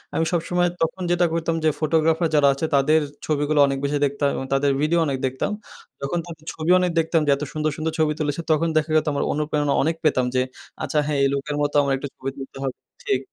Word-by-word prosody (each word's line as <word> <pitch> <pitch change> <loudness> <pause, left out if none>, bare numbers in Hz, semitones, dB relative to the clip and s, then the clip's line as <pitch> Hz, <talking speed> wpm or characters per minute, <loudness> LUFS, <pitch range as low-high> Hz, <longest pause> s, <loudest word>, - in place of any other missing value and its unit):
আমি 160 - +1
সবসময় 175 +1 +1
তখন 165 +3 -1
যেটা 175 0 +3
করতাম 165 0 0
যে - - +6
ফটোগ্রাফার 160 +1 +2
যারা 145 -1 +5
আছে 140 +4 -3
তাদের 155 +3 +4 0.2
ছবিগুলো 150 0 +1
অনেক 135 0 -1
বেশি 145 +1 0
দেখতাম 140 +1 0
এবং 135 - -4
তাদের 140 +1 +2
ভিডিও 165 +3 +2
অনেক 135 -2 -1
দেখতাম। 130 +10 -2 0.5
যখন 155 +5 -1
তাদের 160 -2 -11
ছবিও 165 +3 +2
অনেক 180 -1 +1
দেখতাম 165 0 +2
যে - - +5
এত 150 - -6
সুন্দর, 155 0 0
সুন্দর 160 +1 -2
ছবি 155 -1 +3
তুলেছে 150 +2 -1
তখন 160 +2 +2
দেখা 155 +1 +1
যেত 155 - +3
আমার 140 - 0
অনুপ্রেরণা 150 -1 0
অনেক 160 +3 +1
পেতাম 130 -5 +2
যে, 130 - +3 0.4
আচ্ছা 150 0 -2
হ্যাঁ 150 -2 -1
এই 135 - +4
লোকের 145 +1 -2
মতো 145 0 -1
আমার 140 -1 +1
একটু 140 - -5
ছবি 135 +1 -4
তুলতে 135 0 -9
হবে। 130 -2 -2 0.3
ঠিক, 130 - +1
150 Hz, 220 wpm, -23 LUFS, 140-160 Hz, 0.5 s, যে